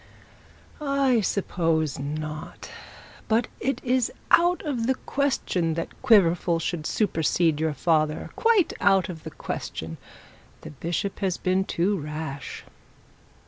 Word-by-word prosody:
'I 275 -4 +2
suppose 165 -7 0
not. 150 +2 -6 0.6
But 225 +2 +2
it 270 - -1
is 255 -1 +1 0.2
out 350 +1 +4
of 245 -6 -1
the 265 - +2
question 190 - -1
that 165 - -5
Quiverful 175 -5 +4
should 165 -1 -3
supersede 165 -5 +1
your 160 -1 0
father 155 0 +1
quite 455 -6 +3
out 195 -3 +4
of 160 -3 -7
the - - -6
question. 80 0 -5 0.6
The - - -9
bishop 170 +7 -3
has 190 -3 0
been 185 +1 +1
too 190 +3 0
rash. 150 -2 -6
175 Hz, 120 wpm, -25 LUFS, 155-230 Hz, 0.6 s, out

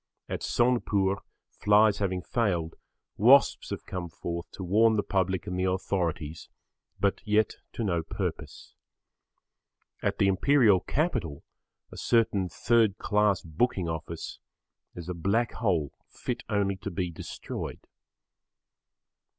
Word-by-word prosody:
At - - -4
Sonepur 105 -6 +1 0.4
flies 105 0 +4
having 95 -3 -1
failed, 90 -10 0 0.4
wasps 130 +7 +5
have - - -5
come 90 -2 -5
forth 85 +1 -5
to 95 - -7
warn 110 +5 +4
the 105 - +1
public 95 -1 0
and 90 -2 -3
the 95 - +1
authorities, 85 -4 -2 0.5
but 100 +1 +1
yet 105 0 +1 0.2
to 115 - -3
no 85 -5 0
purpose. - - -5 1.3
At - - -1
the - - +3
Imperial 105 +1 +4
Capital 90 - -2 0.5
a - - -10
certain 105 -6 +2
third 110 +1 +2
class 105 -4 +1
booking 90 +3 0
office 80 0 -5 0.6
is 85 -1 -8
a 90 - -2
Black 100 +7 0
Hole 85 - 0 0.2
fit 125 -1 -4
only 100 -2 +1
to 95 +2 -5
be 90 -1 -3
destroyed. 80 - -7
95 Hz, 125 wpm, -28 LUFS, 85-110 Hz, 1.3 s, wasps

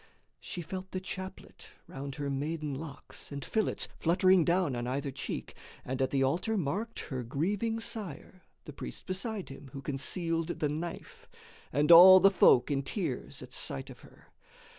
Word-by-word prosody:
She 175 - -6
felt 185 +3 -6
the 185 - -3
chaplet 185 0 -8 0.2
round 135 0 -7
her 145 -1 -4
maiden 150 +1 -3
locks 140 -2 -9
And 140 -1 -5
fillets, 220 -1 0
fluttering 185 +1 +4
down 170 -5 +1
on 120 0 -3
either 140 +2 -2
cheek, 135 - -5 0.3
And 130 +1 -3
at 130 - +2
the 135 -1 +1
altar 180 +11 0
marked 200 +8 -2
her 130 -3 -5
grieving 200 - -1
sire, 190 -5 -6 0.2
The - - -10
priests 60 - -7
beside 195 +2 -3
him 135 0 -11
who 135 - -6
concealed 165 +4 -1
the 150 - +1
knife, 160 +4 -6 0.4
And 150 +5 +3
all 185 +3 +11
the 195 +1 +6
folk 140 -7 +5
in 140 -1 +1
tears 150 - -4
at - - -12
sight - - -2
of - - -13
her. - - -19
160 Hz, 165 wpm, -30 LUFS, 140-185 Hz, 0.4 s, all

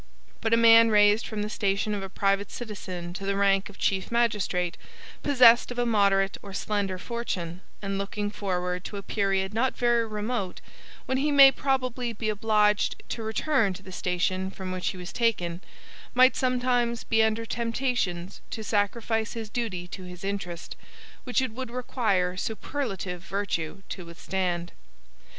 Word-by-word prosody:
But 225 - 0
a 230 - +5
man 230 0 +7
raised 210 +1 +4
from 210 -2 -3
the - - -2
station 205 0 0
of 205 - -3
a 195 - -6
private 195 +1 0
citizen 185 -6 -6
to 195 - -7
the 195 0 0
rank 195 0 +2
of 205 - -14
chief 190 +1 0
magistrate, 210 -7 +1 0.5
possessed 250 -4 +6
of 245 - -6
a 245 - +1
moderate 200 -3 +2
or 200 - -10
slender 200 -2 -1
fortune, 185 -5 -4 0.2
and 195 0 -2
looking 205 +1 -3
forward 180 -3 -2
to 205 - -5
a 200 - -6
period 195 -1 0
not 255 +4 0
very 240 -2 +2
remote 210 -2 -3 0.5
when 260 0 0
he 295 +2 +1
may 275 -1 +9
probably 255 -3 -1
be 215 0 -3
obliged 210 -1 +2
to 230 - -3
return 220 -1 +1
to 190 - -11
the 190 - -10
station 185 +1 -1
from 190 -1 -6
which 185 0 -3
he - - -2
was 180 0 -7
taken, 185 -7 0 0.5
might 255 0 +6
sometimes 245 -2 +1
be 225 0 +2
under 220 +1 +1
temptations 230 -7 -2
to 220 - -5
sacrifice 220 +2 0
his 225 -2 -6
duty 195 -8 -3
to 190 - -7
his 180 0 -10
interest, 195 -4 -4 0.5
which 255 +1 +1
it 260 - -2
would 255 +1 -5
require 220 -7 0
superlative 195 -3 -4
virtue 195 -2 -3
to 180 -3 -6
withstand. 175 0 -3
205 Hz, 165 wpm, -27 LUFS, 190-235 Hz, 0.5 s, may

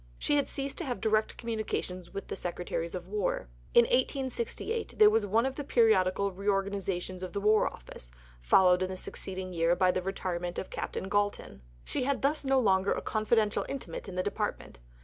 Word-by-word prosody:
She 295 - +1
had 285 - +1
ceased 275 -1 -4
to 345 - -3
have 245 -6 -3
direct 215 +1 +1
communications 215 -6 -4
with 195 - -6
the - - -4
Secretaries 175 -1 -4
for 180 - -3
War. 185 - -2 0.3
In 240 - +9
1868 280 - -1
there 210 0 +8
was 215 -1 +2
one 225 +5 +3
of 265 - -1
the 290 - -3
periodical 200 -6 +3
reorganizations 195 -2 -2
of 185 - -6
the 200 - -1
War 210 +1 +4
Office, - - -9 0.3
followed 180 - +5
in 185 - 0
the 190 - -5
succeeding 185 0 -5
year 170 0 +2
by 185 0 +4
the 185 - -1
retirement 180 -2 -3
of - - -5
Captain 190 - -4
Galton. 205 - -1 0.2
She 155 - -2
had 280 0 -1
thus 295 +2 +1
no 270 0 +2
longer 195 -4 +3
a - - -2
confidential 215 -1 +1
intimate 200 -9 -6
in 185 - -7
the 185 - 0
Department. - - -3
200 Hz, 190 wpm, -30 LUFS, 185-230 Hz, 0.3 s, In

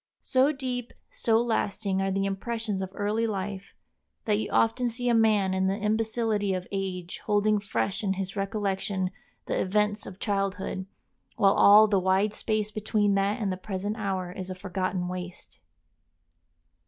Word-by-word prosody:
So 265 +2 +3
deep, 255 -4 -4 0.2
so 225 -1 +2
lasting 205 -4 0
are 195 - 0
the 195 +1 0
impressions 210 +1 -2
of 190 - -3
early 215 +3 0
life 195 -1 -5 0.5
that 210 -1 +2
you - - -3
often 240 +2 +2
see 245 +1 -2
a - - +4
man 215 -4 +3
in 190 0 +1
the 195 +1 0
imbecility 215 -1 0
of 180 0 -5
age 185 -3 -4
holding 210 0 +3
fresh 200 0 -2
in 195 -2 +1
his 195 +1 -4
recollection 195 -2 -1 0.3
the - - -1
events 210 +2 0
of 185 - -9
childhood, 195 -2 -2 0.5
while 200 -3 +4
all 210 +2 +8
the 200 -2 +2
wide 190 +3 +2
space 215 -1 -1
between 210 -1 +1
that 195 +3 +1
and 205 -4 -1
the 185 - -3
present 200 +2 -3
hour 190 -4 -2
is 185 0 -6
a 185 - -4
forgotten 185 -1 -2
waste. 180 0 -7
200 Hz, 160 wpm, -27 LUFS, 190-215 Hz, 0.5 s, all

